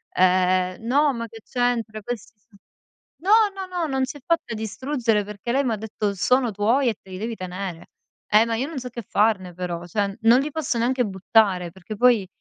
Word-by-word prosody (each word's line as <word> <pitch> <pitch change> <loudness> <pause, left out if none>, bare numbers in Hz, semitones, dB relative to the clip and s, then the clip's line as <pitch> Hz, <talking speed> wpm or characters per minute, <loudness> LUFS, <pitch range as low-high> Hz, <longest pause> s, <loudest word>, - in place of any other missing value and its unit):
ehm" 185 +1 +2
"No, 285 +2 +3
ma 230 -1 -4
che 225 0 -12
c'entra, 235 -3 -1
questi 230 0 -6
son" 205 -1 -24 0.7
no, 395 - +1 0.2
no, 385 -1 -5
no, 335 -2 0
non 265 -1 0
si 280 +3 -8
è - - -17
fatta 330 -8 0
distruggere, 225 0 -1
perché 210 +3 -5
lei 275 +1 +2
m'ha 230 -4 0
detto: 210 -1 -3
"Sono 250 +4 +2
tuoi 230 +6 +2
e 220 - -2
te 190 - -18
li 185 - -6
devi 225 +2 -3
tenere." 185 -2 -6 0.4
Eh, 215 +1 +5
ma 230 - -1
io 260 +5 -1
non 315 -5 -5
so 250 - -6
che 235 -1 -7
farne 195 -3 +1
però, 175 -1 -4
cioè 200 +2 -1
non 235 +3 +6
li 295 +2 -4
posso 295 -6 -2
neanche 250 +1 +1
buttare 190 -2 +2
perché 190 +4 -8
poi 235 -4 +4
225 Hz, 205 wpm, -23 LUFS, 195-250 Hz, 0.7 s, non